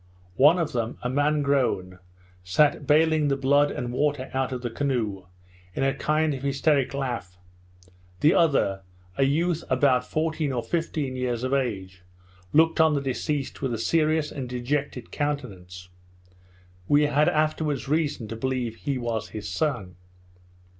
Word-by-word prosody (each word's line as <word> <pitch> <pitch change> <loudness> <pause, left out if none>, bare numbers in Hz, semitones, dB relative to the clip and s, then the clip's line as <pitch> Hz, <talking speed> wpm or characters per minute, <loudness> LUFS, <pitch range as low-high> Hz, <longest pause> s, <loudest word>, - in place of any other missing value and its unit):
One 150 +6 +6
of 165 -3 -1
them, 115 -1 -2
a 125 - -1
man 145 +2 +1
grown, 100 -10 0 0.4
sat 140 +10 +2
bailing 155 0 +4
the 140 -1 +1
blood 140 +2 +3
and 120 0 -4
water 140 -1 -1
out 130 0 -1
of 125 -1 -5
the 120 - -3
canoe, 110 -9 -2 0.5
in - - -1
a 135 0 +2
kind 155 0 0
of 135 - -6
hysteric 140 0 +1
laugh; 120 -10 -4 0.8
the 155 - +5
other, 135 - +2 0.3
a 135 - +2
youth 165 +4 0
about 130 -1 +3
fourteen 155 -1 -1
or 120 -2 -2
fifteen 155 -5 -2
years 125 -2 -2
of 130 +1 -1
age, 95 -9 -2 0.5
looked 160 +3 +4
on 160 -1 +4
the - - +1
deceased 135 +1 -3
with 130 -4 -1
a - - -4
serious 155 +4 +1
and 130 -4 -6
dejected 125 0 -3
countenance; 95 -12 -4 1.0
we 145 +1 +4
had 150 +1 +3
afterwards 155 -2 0
reason 145 -6 -1
to 115 - -5
believe 125 -1 -2
he 140 -3 -2
was 115 -3 -3
his 105 -2 -6
son. 100 - -2
135 Hz, 155 wpm, -25 LUFS, 120-150 Hz, 1.0 s, One